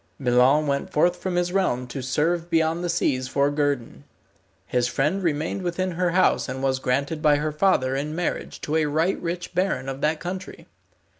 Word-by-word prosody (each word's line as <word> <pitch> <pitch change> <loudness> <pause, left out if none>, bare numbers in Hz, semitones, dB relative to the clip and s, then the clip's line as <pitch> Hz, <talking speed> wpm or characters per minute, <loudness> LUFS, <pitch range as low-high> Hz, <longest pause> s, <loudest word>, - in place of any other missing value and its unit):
Milon 130 +3 +3
went 140 -1 -1
forth 175 +4 +3
from 180 0 -3
his 175 0 0
realm 155 -11 +1
to 135 +2 -5
serve 165 +6 0
beyond 165 +1 +1
the 175 - -1
seas 130 -6 0
for 140 +2 +1
guerdon. 145 -4 -2 0.6
His 125 -1 0
friend 150 +10 0
remained 160 +2 -1
within 185 +1 -2
her 180 +1 0
house 180 -5 +2
and 130 +1 -4
was 130 -1 +1
granted 140 +5 -1
by 150 -1 +5
her 150 +1 -1
father 150 -6 +2
in 150 +3 -3
marriage 175 0 -3
to 155 +2 -1
a 155 -1 +2
right 160 +6 0
rich 175 +1 -4
baron 180 -8 0
of 135 +1 -5
that 155 +1 +1
country. 185 +1 -6
155 Hz, 190 wpm, -24 LUFS, 135-175 Hz, 0.6 s, by